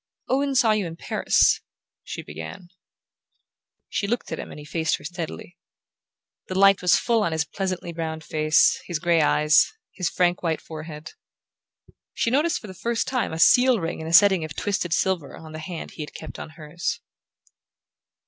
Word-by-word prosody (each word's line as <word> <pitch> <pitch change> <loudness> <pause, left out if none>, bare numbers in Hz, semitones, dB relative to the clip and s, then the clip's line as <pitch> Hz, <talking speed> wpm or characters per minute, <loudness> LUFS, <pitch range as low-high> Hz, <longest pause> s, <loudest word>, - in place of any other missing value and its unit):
"Owen 275 +1 +1
saw 245 -4 +4
you 210 -4 +1
in 165 - -7
Paris," - - +2 0.4
she - - -7
began. 80 - -9 1.2
She 200 - -2
looked 240 +4 -2
at - - -3
him - - -7
and - - -10
he 150 - -10
faced 160 +1 0
her - - -16
steadily. 170 +2 -7 0.9
The 185 - -3
light 195 0 +6
was 180 -1 +5
full 230 -2 +1
on 170 -5 0
his 160 0 0
pleasantly 185 0 -4
browned 160 -1 -4
face, 155 0 +3
his 175 - -2
grey 170 0 +2
eyes, 150 +1 +4 0.2
his 180 -3 -1
frank 180 0 +1
white 165 -3 -1
forehead. 155 -1 -9 1.0
She 230 - 0
noticed 300 +6 +2
for - - -12
the 190 - -8
first 230 +5 -2
time 255 -2 -1
a 160 - -4
seal 245 +7 +5
ring 165 -1 -4
in 160 - -6
a - - -4
setting 190 -2 +6
of 155 -2 -7
twisted 195 -4 -2
silver 175 -2 0
on 160 -1 -11
the 155 - -7
hand 165 +1 -7
he - - -9
had 150 - -8
kept - - -8
on - - -7
hers. 170 +8 -4
175 Hz, 180 wpm, -24 LUFS, 160-200 Hz, 1.2 s, light